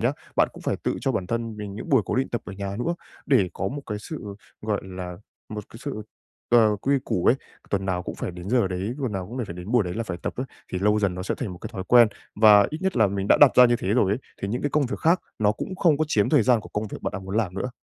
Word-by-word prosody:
nhá, -, -, +2 dB, 0.2 s
bạn -, -, +4 dB
cũng -, -, -12 dB
phải -, -, 0 dB
tự -, -, -2 dB
cho -, -, 0 dB
bản 90 Hz, -, -2 dB
thân 115 Hz, +1 st, -3 dB
mình 105 Hz, -2 st, -6 dB
những 110 Hz, -, -7 dB
buổi 135 Hz, -6 st, +4 dB
cố -, -, -2 dB
định 130 Hz, +1 st, +1 dB
tập 120 Hz, -, -2 dB
ở -, -, -7 dB
nhà 100 Hz, 0 st, -5 dB
nữa 170 Hz, +8 st, 0 dB, 0.3 s
để 120 Hz, -11 st, +4 dB
có -, -, -2 dB
một 140 Hz, +2 st, -6 dB
cái 105 Hz, -1 st, -3 dB
sự, 105 Hz, -7 st, -7 dB, 0.3 s
gọi 105 Hz, -2 st, -1 dB
là, 90 Hz, -1 st, -6 dB, 0.3 s
một 105 Hz, -1 st, -6 dB
cái 115 Hz, -, -12 dB
sự, 130 Hz, -5 st, -5 dB, 0.5 s
ờ, 110 Hz, -3 st, +5 dB
quy 135 Hz, +7 st, +1 dB
củ 90 Hz, -, -1 dB
ấy. -, -, +7 dB, 0.4 s
Tuần 95 Hz, -1 st, 0 dB
nào 90 Hz, -1 st, -1 dB
cũng -, -, -6 dB
phải -, -, -4 dB
đến 90 Hz, +2 st, -8 dB
giờ 120 Hz, -6 st, +3 dB
đấy, 95 Hz, +5 st, -3 dB
tuần 130 Hz, -6 st, -2 dB
nào 95 Hz, -2 st, -3 dB
cũng 120 Hz, +4 st, -4 dB
phải 85 Hz, -, -7 dB
đến 90 Hz, +3 st, -8 dB
buổi 120 Hz, -, +5 dB
đấy 90 Hz, 0 st, -4 dB
là 115 Hz, -, -2 dB
phải 95 Hz, -6 st, -4 dB
tập -, -, -2 dB
ấy 130 Hz, -, -3 dB, 0.3 s
thì 90 Hz, -, -1 dB
lâu 105 Hz, +2 st, +3 dB
dần 100 Hz, -3 st, +1 dB
nó 90 Hz, -, -5 dB
sẽ -, -, -2 dB
thành 110 Hz, -7 st, -3 dB
một 90 Hz, -, -10 dB
cái -, -, -7 dB
thói 95 Hz, -3 st, -5 dB
quen, 120 Hz, -2 st, +7 dB, 0.3 s
và 105 Hz, -2 st, +7 dB
ít 155 Hz, -, -4 dB
nhất 190 Hz, 0 st, 0 dB
là 110 Hz, -3 st, +5 dB
mình 100 Hz, 0 st, -3 dB
đã -, -, +7 dB
đặt 145 Hz, -, +9 dB
ra 125 Hz, -, +9 dB
như 120 Hz, 0 st, +2 dB
thế 95 Hz, -, -4 dB
rồi 100 Hz, -5 st, +3 dB
ấy, 105 Hz, -, 0 dB, 0.2 s
thì 100 Hz, -, -1 dB
những 120 Hz, +4 st, -2 dB
cái 145 Hz, -, 0 dB
công 145 Hz, -2 st, +2 dB
việc 125 Hz, -, -4 dB
khác 170 Hz, +3 st, +3 dB, 0.2 s
nó 105 Hz, -1 st, +3 dB
cũng 185 Hz, -, -6 dB
không 165 Hz, -5 st, +3 dB
có 155 Hz, -, +2 dB
chiếm 105 Hz, -8 st, +2 dB
thời 150 Hz, -6 st, +4 dB
gian 120 Hz, -1 st, +4 dB
của -, -, -12 dB
công 105 Hz, +1 st, -3 dB
việc -, -, -8 dB
bạn -, -, -2 dB
đang 95 Hz, 0 st, -6 dB
muốn 95 Hz, +3 st, -4 dB
làm 100 Hz, -6 st, 0 dB
nữa. 125 Hz, +6 st, -3 dB
105 Hz, 310 wpm, -25 LUFS, 95-125 Hz, 0.5 s, đặt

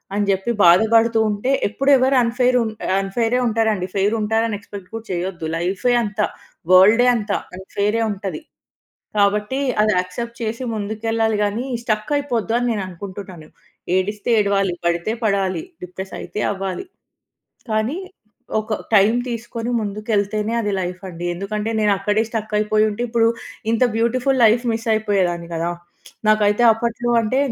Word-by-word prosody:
అని 205 Hz, 0 st, +1 dB
చెప్పి 195 Hz, +4 st, +1 dB
బాధపడుతూ 225 Hz, +5 st, +5 dB
ఉంటే 210 Hz, +5 st, -2 dB, 0.2 s
ఎప్పుడు 270 Hz, +7 st, -1 dB
ఎవరు 265 Hz, +1 st, +3 dB
అన్‌ఫెయిర్ 250 Hz, +2 st, +2 dB
ఉన్ 220 Hz, -1 st, -1 dB, 0.3 s
అన్‌ఫెయిరే 225 Hz, +5 st, 0 dB
ఉంటారండి. 220 Hz, -4 st, 0 dB
ఫెయిర్ 200 Hz, +2 st, +2 dB
ఉంటారని 220 Hz, +1 st, 0 dB
ఎక్స్‌పెక్ట్ 200 Hz, -2 st, -10 dB
కూడా 225 Hz, 0 st, -6 dB
చేయొద్దు. 175 Hz, -2 st, -3 dB
లైఫే 190 Hz, +8 st, 0 dB
అంత. 210 Hz, 0 st, -6 dB, 0.5 s
వర‌ల్డె 210 Hz, +7 st, +7 dB
అంత. 210 Hz, -3 st, -3 dB, 0.2 s
అన్‌ఫెయిరె 205 Hz, +4 st, -1 dB
ఉంటది. 200 Hz, -, -5 dB, 0.8 s
కాబట్టి 210 Hz, +6 st, +1 dB, 0.2 s
అది 215 Hz, -, +3 dB
యాక్సెప్ట్ 235 Hz, +6 st, -3 dB
చేసి 230 Hz, +2 st, -3 dB
ముందుకెళ్లాలి 220 Hz, +1 st, -1 dB
గానీ, 210 Hz, +5 st, -1 dB, 0.2 s
స్టక్కైపోద్దు 230 Hz, +1 st, -1 dB
అని 245 Hz, 0 st, 0 dB
నేను 205 Hz, -3 st, -2 dB
అనుకుంటున్నాను. 185 Hz, -3 st, -9 dB, 0.5 s
ఏడిస్తే 205 Hz, +4 st, -1 dB
ఏడవాలి. 195 Hz, -3 st, +1 dB
పడితే 170 Hz, +5 st, 0 dB
పడాలి. 200 Hz, +4 st, 0 dB, 0.2 s
డిప్రెస్ 190 Hz, +2 st, -7 dB
అయితే -, -, -6 dB
అవ్వాలి. 195 Hz, -, -4 dB, 0.9 s
కానీ 220 Hz, +9 st, 0 dB, 0.6 s
ఒక 215 Hz, 0 st, -4 dB, 0.2 s
టైమ్ 210 Hz, +4 st, +5 dB
తీసుకొని 235 Hz, 0 st, -4 dB
ముందుకెళ్తేనే 210 Hz, +1 st, -1 dB
అది 205 Hz, -1 st, -1 dB
లైఫ్ 180 Hz, +1 st, -5 dB
అండి. 175 Hz, 0 st, -7 dB
ఎందుకంటే, 210 Hz, +3 st, -3 dB
నేను 205 Hz, -1 st, +3 dB
అక్కడే 210 Hz, +2 st, +1 dB
స్టక్ 220 Hz, -1 st, -4 dB
అయిపోయి 215 Hz, 0 st, +2 dB
ఉంటే 205 Hz, -, -5 dB
ఇప్పుడు 230 Hz, -1 st, +3 dB, 0.4 s
ఇంత 230 Hz, +2 st, +2 dB
బ్యూటిఫుల్ 255 Hz, +3 st, +1 dB
లైఫ్ 230 Hz, +3 st, +4 dB
మిస్ 225 Hz, +1 st, -4 dB
అయిపోయేదాన్ని 190 Hz, -6 st, 0 dB
గదా! 165 Hz, +1 st, -1 dB, 0.6 s
నాకైతే 215 Hz, +1 st, +3 dB
అప్పట్లో 235 Hz, +2 st, -2 dB
అంటే 225 Hz, +4 st, -1 dB
215 Hz, 135 wpm, -20 LUFS, 195-230 Hz, 0.9 s, వర‌ల్డె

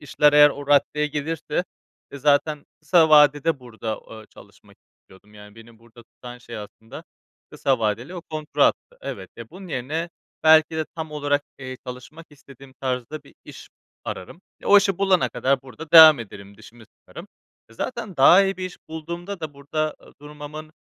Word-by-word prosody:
işler 150 Hz, 0 st, +2 dB
eğer 145 Hz, 0 st, +7 dB
o 145 Hz, 0 st, -8 dB
raddeye 145 Hz, +1 st, +2 dB
gelirse, 155 Hz, +4 st, -3 dB, 0.5 s
e, 140 Hz, -, -9 dB
zaten 145 Hz, +1 st, +1 dB, 0.2 s
kısa 160 Hz, +1 st, +4 dB
vadede 150 Hz, 0 st, +4 dB
burada, 110 Hz, -3 st, -6 dB
ııı, 110 Hz, -1 st, -11 dB
çalışmak -, -, -19 dB, 0.2 s
istiyordum. 105 Hz, +3 st, -21 dB
Yani 105 Hz, 0 st, -14 dB
beni 115 Hz, 0 st, -16 dB
burada 115 Hz, +1 st, -18 dB
tutan 120 Hz, +1 st, -13 dB
şey 120 Hz, -1 st, -10 dB
aslında 110 Hz, +1 st, -11 dB, 0.5 s
kısa 135 Hz, -2 st, 0 dB
vadeli 115 Hz, -, -3 dB
o 175 Hz, -, -7 dB
kontrattı. 155 Hz, -, -1 dB
Evet. -, -, -8 dB
Ya, -, -, -11 dB
bunun 190 Hz, 0 st, -12 dB
yerine 155 Hz, +5 st, -4 dB, 0.3 s
belki 160 Hz, 0 st, +5 dB
de 160 Hz, -, -1 dB
tam 160 Hz, -1 st, -6 dB
olarak, 145 Hz, -1 st, -1 dB, 0.2 s
eee, 130 Hz, -1 st, -8 dB
çalışmak 130 Hz, +6 st, -10 dB
istediğim 135 Hz, -2 st, -17 dB
tarzda 130 Hz, +3 st, -4 dB
bir 140 Hz, -, -20 dB
iş -, -, -13 dB, 0.4 s
ararım 95 Hz, -, -8 dB, 0.2 s
ve -, -, -9 dB
o 205 Hz, -, +8 dB
işi 195 Hz, -2 st, -1 dB
bulana 190 Hz, -2 st, +2 dB
kadar 130 Hz, +2 st, -1 dB
burada 135 Hz, +4 st, -12 dB
devam 160 Hz, -3 st, +10 dB
ederim, 100 Hz, -3 st, -11 dB
dişimi 110 Hz, +2 st, -16 dB
sıkarım. -, -, -14 dB, 0.4 s
E, -, -, -19 dB
zaten 225 Hz, -, -6 dB
daha 175 Hz, +8 st, +7 dB
iyi 195 Hz, 0 st, -2 dB
bir 185 Hz, -, -5 dB
iş 185 Hz, -, -11 dB
bulduğumda 170 Hz, +4 st, -7 dB
da 155 Hz, -3 st, -7 dB
burada, 150 Hz, +2 st, -3 dB
ııı, -, -, -18 dB
durmamın, 150 Hz, +1 st, -10 dB
145 Hz, 170 wpm, -22 LUFS, 125-160 Hz, 0.5 s, devam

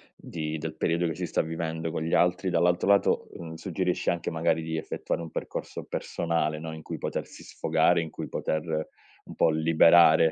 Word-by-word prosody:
di 80 Hz, -2 st, -5 dB
del 80 Hz, 0 st, -5 dB
periodo 85 Hz, +2 st, +1 dB
che 80 Hz, -, -3 dB
si 90 Hz, +2 st, -3 dB
sta -, -, 0 dB
vivendo 80 Hz, 0 st, -3 dB
con 80 Hz, -, -3 dB
gli 80 Hz, -, -2 dB
altri, 90 Hz, +2 st, +2 dB
dall'altro 90 Hz, +1 st, +2 dB
lato, 100 Hz, 0 st, +3 dB
mhmm, 80 Hz, -1 st, -8 dB
suggerisci 90 Hz, +2 st, -1 dB
anche 85 Hz, -1 st, -1 dB
magari 80 Hz, 0 st, +1 dB
di 80 Hz, 0 st, -3 dB
effettuare 80 Hz, -, -3 dB
un 85 Hz, -, -6 dB
percorso -, -, -5 dB
personale, 80 Hz, -2 st, -2 dB
no. 80 Hz, 0 st, -6 dB
In 80 Hz, 0 st, -9 dB
cui -, -, -5 dB
potersi -, -, -5 dB
sfogare, 80 Hz, +2 st, +2 dB
in 80 Hz, -, -5 dB
cui -, -, -7 dB
poter 80 Hz, -1 st, -2 dB, 0.6 s
un -, -, -10 dB
po' -, -, +4 dB
liberare 80 Hz, 0 st, +6 dB
80 Hz, 185 wpm, -27 LUFS, 80-85 Hz, 0.6 s, liberare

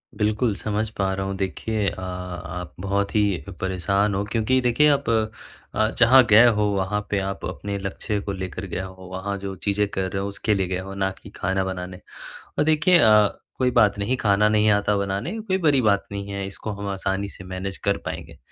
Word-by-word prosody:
बिल्कुल, 110 Hz, +2 st, +1 dB
समझ 105 Hz, 0 st, -2 dB
पा 95 Hz, -1 st, +1 dB
रहा 95 Hz, 0 st, -2 dB
हूँ 95 Hz, 0 st, -3 dB
देखिए 100 Hz, +2 st, -2 dB
अ, 95 Hz, -, -8 dB
आप 90 Hz, -1 st, -6 dB
बहुत 100 Hz, +1 st, -1 dB
ही 100 Hz, -4 st, +2 dB, 0.2 s
परेशान 100 Hz, +2 st, +1 dB
हो 100 Hz, -, 0 dB
क्योंकि 115 Hz, +4 st, +1 dB
देखिए 125 Hz, +5 st, +4 dB
आप, 140 Hz, -5 st, +1 dB, 0.7 s
अ, 110 Hz, +1 st, +2 dB
जहाँ 125 Hz, +2 st, +8 dB
गए 110 Hz, +3 st, +8 dB
हो 105 Hz, -3 st, +3 dB
वहाँ 105 Hz, +2 st, 0 dB
पे 100 Hz, -, +1 dB
आप 95 Hz, 0 st, -4 dB
अपने 100 Hz, 0 st, -4 dB
लक्ष्य 100 Hz, +2 st, -3 dB
को 100 Hz, -, -4 dB
लेकर 95 Hz, 0 st, -5 dB
गए 90 Hz, -, -4 dB
हो। 95 Hz, -1 st, -9 dB
वहाँ 95 Hz, +2 st, -3 dB
जो 95 Hz, 0 st, -5 dB
चीज़ें 100 Hz, 0 st, +2 dB
कर 95 Hz, -1 st, -2 dB
रहे 95 Hz, -1 st, -2 dB
हो 100 Hz, -, -2 dB
उसके 105 Hz, +2 st, -1 dB
लिए 95 Hz, -2 st, 0 dB
गए 90 Hz, 0 st, -2 dB
हो 95 Hz, +1 st, -7 dB
ना 95 Hz, 0 st, 0 dB
कि -, -, -11 dB
खाना 95 Hz, 0 st, 0 dB
बनाने। 90 Hz, -1 st, -5 dB, 0.6 s
और -, -, +4 dB
देखिए 160 Hz, +3 st, +4 dB
अ, 105 Hz, -1 st, +6 dB, 0.3 s
कोई 130 Hz, -1 st, +2 dB
बात 100 Hz, -1 st, +4 dB
नहीं 115 Hz, +6 st, 0 dB
खाना 105 Hz, -2 st, +3 dB
नहीं 105 Hz, 0 st, +3 dB
आता 105 Hz, 0 st, +2 dB
बनाने 100 Hz, -, -2 dB
कोई 190 Hz, -3 st, -1 dB
बड़ी 150 Hz, -7 st, +3 dB
बात 100 Hz, -2 st, +3 dB
नहीं 100 Hz, 0 st, -5 dB
है 100 Hz, -1 st, -3 dB
इसको 100 Hz, +2 st, -7 dB
हम 100 Hz, 0 st, -5 dB
आसानी 95 Hz, +1 st, -2 dB
से 95 Hz, -, -12 dB
मैनेज 95 Hz, +1 st, -5 dB
कर 100 Hz, -, +2 dB
पाएँगे। -, -, -6 dB
100 Hz, 205 wpm, -24 LUFS, 95-110 Hz, 0.7 s, जहाँ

